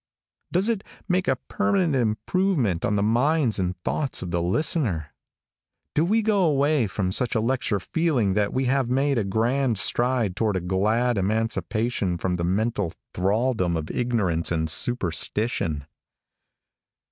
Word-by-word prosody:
Does 185 +4 +2
it 225 -4 0 0.2
make 185 0 +1
a - - +3
permanent 195 -7 0
improvement 120 - 0
on 105 - +1
the 100 - +1
minds 120 +2 +2
and 90 -1 -1
thoughts 140 -9 -1
of 90 - -5
the 85 -1 0
listener? 90 - 0 0.8
Do 150 - +2
we 215 +6 +2
go 205 -2 +2
away 145 -5 +2
from 95 -1 -2
such 120 +5 +1
a - - +3
lecture 115 -3 0
feeling 125 - 0
that 105 0 +1
we 130 +1 0
have 130 -1 +1
made 135 0 +1
a - - 0
grand 115 +4 0
stride 120 -1 +1
toward 110 -3 0
a - - +1
glad 105 +6 +1
emancipation 110 -1 -1
from 90 0 -1
the 85 - -2
mental 100 0 0 0.2
thraldom 95 -2 +1
of 80 -1 -4
ignorance 100 -10 0
and 80 -2 0
superstition? 90 - -1
115 Hz, 145 wpm, -24 LUFS, 95-135 Hz, 0.8 s, a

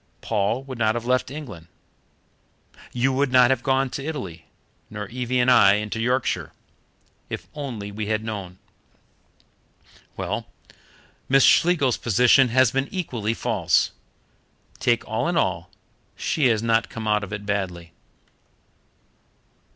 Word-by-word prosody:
Paul 110 +4 -1
would 130 -3 -8
not 110 0 +2
have 120 -1 -4
left 130 +1 +1
England, 130 - -9 1.2
you 130 +2 +1
would 135 0 0
not 125 0 +6
have 130 -3 +1
gone 135 0 +1
to 135 - -5
Italy, 100 - -6 0.4
nor 105 -1 -6
Evie 125 +1 -2
and 125 +1 +4
I 100 -5 +7
into 105 +1 -3
Yorkshire, 125 +2 -1 0.8
if - - -6
only 120 -9 -6
we 105 +1 -5
had 110 0 -1
known. 100 -5 -6 1.6
Well, - - -3 0.8
Miss 135 0 +5
Schlegel's 165 -8 +4
position 125 +4 +4
has 130 0 +3
been 135 +1 -1
equally 115 - -3
false. - - +1 0.9
Take - - +1
all - - -1
in - - 0
all, - - -1 0.5
she 150 -5 +1
has 115 -2 +1
not 115 0 +1
come 110 -1 -6
out 105 0 +2
of 100 - -7
it 105 0 -6
badly." 90 -5 -3
120 Hz, 135 wpm, -23 LUFS, 105-130 Hz, 1.6 s, I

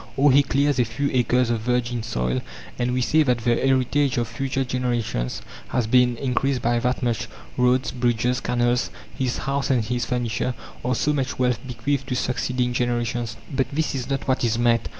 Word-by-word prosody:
Or 140 +1 +5
he 140 +2 +6
clears 140 0 +1
a - - +5
few 120 +5 -2
acres 125 -1 +2
of 115 - 0
virgin 120 +1 0
soil, 65 - -1 0.4
and 125 0 +1
we 125 0 0
say 155 +5 +3
that 125 -5 +3
the 120 0 +3
heritage 135 +2 +2
of 120 -1 0
future 135 +3 -2
generations 120 - -2 0.2
has 125 -3 0
been 125 +1 +3
increased 130 0 0
by 120 0 +2
that 125 +2 -1
much. 120 -3 0 0.3
Roads, 125 +1 +2
bridges, 120 0 +1
canals, 120 -1 +1 0.3
his 130 -2 -1
house 140 0 -1
and 125 -5 +2
his 120 +1 -1
furniture 125 0 -1 0.3
are 125 0 +1
so 150 +5 +1
much 135 -3 -2
wealth 125 -3 +1
bequeathed 135 +3 -2
to 125 - -1
succeeding 125 0 -1
generations. 120 -1 -1 0.2
But 130 -2 +1
this 155 +2 -1
is 130 -1 -4
not 135 0 -2
what 130 -1 +1
is 115 -1 +1
meant. 120 -1 +2
125 Hz, 190 wpm, -23 LUFS, 120-130 Hz, 0.4 s, he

